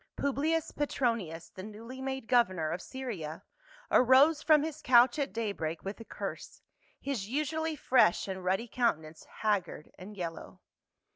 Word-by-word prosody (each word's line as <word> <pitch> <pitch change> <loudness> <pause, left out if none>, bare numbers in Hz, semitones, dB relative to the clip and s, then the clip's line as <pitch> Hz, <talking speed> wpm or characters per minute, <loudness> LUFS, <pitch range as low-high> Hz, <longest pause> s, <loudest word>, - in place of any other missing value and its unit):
Publius 300 +3 0
Petronius, 230 - -2
the 185 - -10
newly 225 +6 -9
made 265 -2 -4
governor 185 -10 +2
of 180 - -3
Syria, 210 - -6 0.5
arose 270 +5 +6
from 305 -2 +5
his 310 -1 -5
couch 245 +1 +5
at 280 - -1
day 225 0 -2
break 160 -3 -4
with 195 +3 -6
a - - -8
curse, - - -7 0.4
his 235 -8 -4
usually 310 +4 -1
fresh 255 -11 +3
and 190 -1 -5
ruddy 190 +6 0
countenance 165 -10 -1
haggard 205 -7 -2
and 200 +3 -10
yellow. 170 -3 -6
235 Hz, 145 wpm, -31 LUFS, 185-275 Hz, 0.5 s, arose